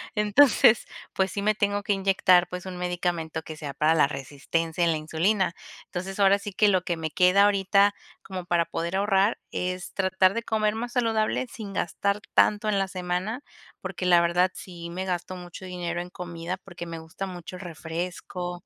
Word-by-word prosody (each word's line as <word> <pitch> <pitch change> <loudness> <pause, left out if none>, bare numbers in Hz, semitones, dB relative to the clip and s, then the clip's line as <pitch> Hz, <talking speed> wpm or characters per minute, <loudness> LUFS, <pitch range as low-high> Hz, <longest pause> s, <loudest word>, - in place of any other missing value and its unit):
Entonces, 215 +1 +5 0.3
pues, 190 0 +1
sí 200 - -3
me 215 +1 +2
tengo 205 0 0
que 205 - +1
inyectar, 190 -2 +4
pues, 180 +1 -6
un 185 -1 -6
medicamento 175 -3 -2
que 155 - -8
sea 145 -2 -6
para 155 +4 +3
la 150 -3 +5
resistencia 150 +5 -2
en 170 - +4
la 160 - 0
insulina. 170 +5 0 0.3
Entonces, 190 +2 -6
ahora 200 0 +5
sí 205 - -6
que 210 +2 +4
lo 185 -3 +2
que 175 -2 -2
me 160 -1 -4
queda 185 +4 +5
ahorita 200 0 +3 0.3
como 185 -2 -6
para 170 -1 +2
poder 170 +3 -3
ahorrar, 200 +1 +2
es 180 0 -3
tratar 190 0 +2
de 230 - -2
comer 215 -1 0
más 240 +2 -4
saludable 225 0 +1
sin 210 -3 -8
gastar 200 +3 -1
tanto 210 +1 +3
en 200 - +2
la 195 -1 -1
semana, 185 +7 -3 0.4
porque, 180 - -5
la 175 -1 +6
verdad, 175 +2 +2
sí 170 -2 -9
me 185 +2 -4
gasto 180 0 -3
mucho 175 +1 -10
dinero 175 -1 -3
en 180 - -8
comida, 175 0 -5
porque 175 -2 -9
me 165 -1 -6
gusta 160 +4 -6
mucho 180 0 -8
el - - -10
refresco 175 +1 -5
180 Hz, 190 wpm, -26 LUFS, 170-200 Hz, 0.4 s, la